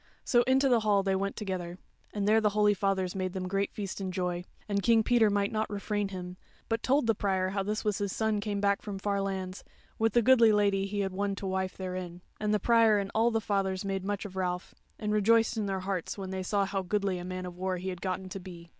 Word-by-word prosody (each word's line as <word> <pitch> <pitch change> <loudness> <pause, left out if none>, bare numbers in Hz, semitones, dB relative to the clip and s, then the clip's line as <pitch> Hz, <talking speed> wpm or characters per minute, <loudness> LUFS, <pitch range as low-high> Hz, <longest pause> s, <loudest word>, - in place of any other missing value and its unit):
So 240 - +4
into 265 +1 +4
the 245 -3 +4
Hall 205 -2 +2
they 195 -1 +1
went 195 +1 -2
together, 185 -4 -4 0.3
and 205 -1 -2
there 220 +1 +5
the 210 - +3
holy 210 0 +5
fathers 190 -2 0
made 185 -1 -3
them 185 -1 -3
great 195 +2 -1
feast 200 -3 -5
and 190 -1 -3
joy; 180 -1 -2 0.2
and 200 -1 0
King 225 +1 +4
Peter 230 -2 +4
might 200 0 +1
not 220 -1 -1
refrain 205 0 -2
him, 180 -1 -7 0.3
but 225 0 0
told 275 +1 +2
the 225 - +3
Prior 190 -2 0
how 195 +1 -1
this 210 +3 -2
was 210 -1 0
his 200 -1 -1
son 220 0 0
come 205 -1 -2
back 200 0 +2
from 205 -2 -5
far 200 0 -1
lands, 190 -1 -4 0.4
with 225 -1 +2
the 240 - +4
goodly 235 -2 +6
Lady 200 -2 +2
he 205 0 -2
had 190 -1 -2
won 200 +1 -1
to 195 - -6
wife 190 0 -2
therein; 180 -2 -5 0.2
and 210 0 0
the 210 - +2
Prior 225 0 +5
and 200 -1 -2
all 225 +2 +3
the 225 -1 +1
fathers 195 -2 -1
made 195 -1 -2
much 205 +1 -3
of 190 -2 -8
Ralph, 180 -1 -2 0.2
and 210 -1 -2
rejoiced 225 +2 +3
in 215 -2 -1
their 190 -1 -2
hearts 185 -1 -3
when 190 -1 -5
they 190 0 -3
saw 200 +2 +1
how 195 0 -2
goodly 195 0 -1
a - - -6
man 185 0 -5
of 180 -1 -7
war 185 0 -2
he 185 +2 -4
had 180 -2 -6
gotten 185 0 -3
to 195 - -6
be. 175 -2 -11
200 Hz, 250 wpm, -30 LUFS, 185-210 Hz, 0.4 s, goodly